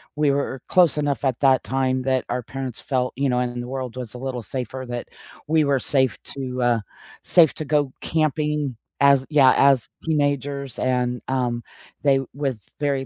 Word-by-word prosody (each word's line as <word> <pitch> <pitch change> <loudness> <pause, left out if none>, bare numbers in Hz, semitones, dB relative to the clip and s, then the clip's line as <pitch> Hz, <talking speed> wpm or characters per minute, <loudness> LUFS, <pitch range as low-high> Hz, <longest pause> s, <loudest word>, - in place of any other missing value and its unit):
we 150 -2 +3
were 140 -2 -2
close 175 -5 +4
enough 145 -1 -1
at 130 -3 0
that 135 -2 +4
time 130 0 0
that 130 -1 0
our 125 +1 -1
parents 130 -1 -5
felt, 125 -2 -1
you 135 0 0
know, 125 - +1
and 120 -1 -2
the 120 - -7
world 130 -2 -5
was 125 -2 -7
a - - -5
little 130 -1 -4
safer 130 +3 -5
that 120 0 -5 0.4
we 155 0 +3
were 140 -1 +2
safe 130 -1 +1
to, 130 -2 -5
uh, 120 -2 +3 0.4
safe 165 -5 +5
to 155 - -5
go 145 -2 +1
camping 150 -3 0 0.2
as 140 -1 +5
Yeah, 140 -4 +6
as 135 -4 +4 0.2
teenagers 140 -4 -1
and, 125 -1 0
um, 125 -2 -1 0.4
they 140 -2 +4
with 135 -5 -2 0.2
very 140 -2 0
135 Hz, 180 wpm, -23 LUFS, 125-145 Hz, 0.4 s, Yeah